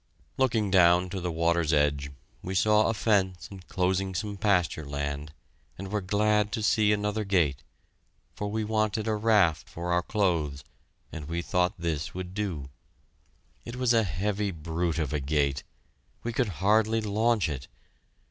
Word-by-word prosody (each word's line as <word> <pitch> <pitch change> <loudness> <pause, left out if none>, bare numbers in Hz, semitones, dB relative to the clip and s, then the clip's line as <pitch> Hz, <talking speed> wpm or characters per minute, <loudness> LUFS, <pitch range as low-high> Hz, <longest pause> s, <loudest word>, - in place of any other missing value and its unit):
Looking 110 -6 +1
down 90 -1 +5
to 95 -1 -4
the 90 0 -2
water's 85 -1 +1
edge, 75 -2 +1 0.3
we 95 +1 -5
saw 105 +3 +4
a 115 - +1
fence 95 -5 +1
enclosing 95 0 -2
some 105 +2 -3
pasture 90 -7 +1
land, 70 +1 -4 0.5
and 95 +1 -7
were 105 -1 0
glad 105 +2 +1
to 110 - -2
see 105 0 +3
another 105 +1 0
gate, 85 -9 +1 0.7
for 105 - -4
we 110 +2 -2
wanted 110 0 0
a 110 - +1
raft 105 - +2
for 85 +1 -4
our 90 0 +3
clothes, 85 -9 -1 0.5
and 75 - -7
we 85 +1 -3
thought 90 +2 +1
this 85 -2 -3
would 90 0 -6
do. 90 -10 -3 0.9
It 120 - -7
was 125 -1 +2
a 115 - +5
heavy 100 +3 -1
brute 85 0 -2
of 75 -3 -2
a 75 - 0
gate. 70 -1 0 0.6
We 120 - -3
could 115 - 0
hardly 110 +2 +3
launch 110 +1 +1
it. 70 -4 -5
95 Hz, 155 wpm, -28 LUFS, 80-105 Hz, 0.9 s, down